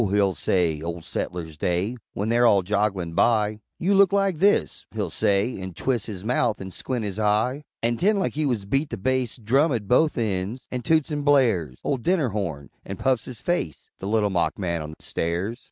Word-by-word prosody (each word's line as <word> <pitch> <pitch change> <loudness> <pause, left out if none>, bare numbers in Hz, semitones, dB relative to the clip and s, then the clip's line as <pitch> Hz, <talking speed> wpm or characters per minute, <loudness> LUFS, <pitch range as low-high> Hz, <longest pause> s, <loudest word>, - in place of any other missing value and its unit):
he'll 100 -1 +2
say, 85 -5 0
Ole 85 0 -5
Settlers' 80 -3 -4
Day, 90 +7 0 0.2
When 105 +3 -2
they're 120 +1 +4
all 100 -4 +4
jogglin' 100 -3 -1
by, 105 +1 +2 0.2
"You 190 +4 +1
look 195 -2 +5
like 195 -3 +2
this," 205 +3 +2
He'll - - -3
say, 100 +2 +1
an' 95 -2 -7
twis' 120 -1 -1
His 100 -4 -6
mouth 120 -2 +1
an' 95 0 -7
squint 125 +3 -3
his 100 0 -4
eye 110 +7 +1 0.2
An' 120 0 +1
'tend 205 - +3
like 190 - 0
he 150 0 0
wuz 115 -7 -1
beat 135 +7 0
the - - -4
bass 130 +3 0
Drum 135 +7 +2
at 110 -6 -2
both 150 +8 +3
ends 105 +1 -2
an' 125 - -2
toots 160 +1 +2
and 145 -1 -2
blares 115 - +3
Ole 140 - 0
dinner 155 +1 +1
horn 85 -9 -4
an' - - -6
puffs 130 -4 +1
his 125 -3 -8
face 85 - -2
The 95 - -5
Little 105 -1 +2
Mock 90 -2 0
man 85 -4 -2
on 75 0 -7
the - - -10
Stairs! 90 +8 -2
110 Hz, 205 wpm, -24 LUFS, 95-130 Hz, 0.2 s, look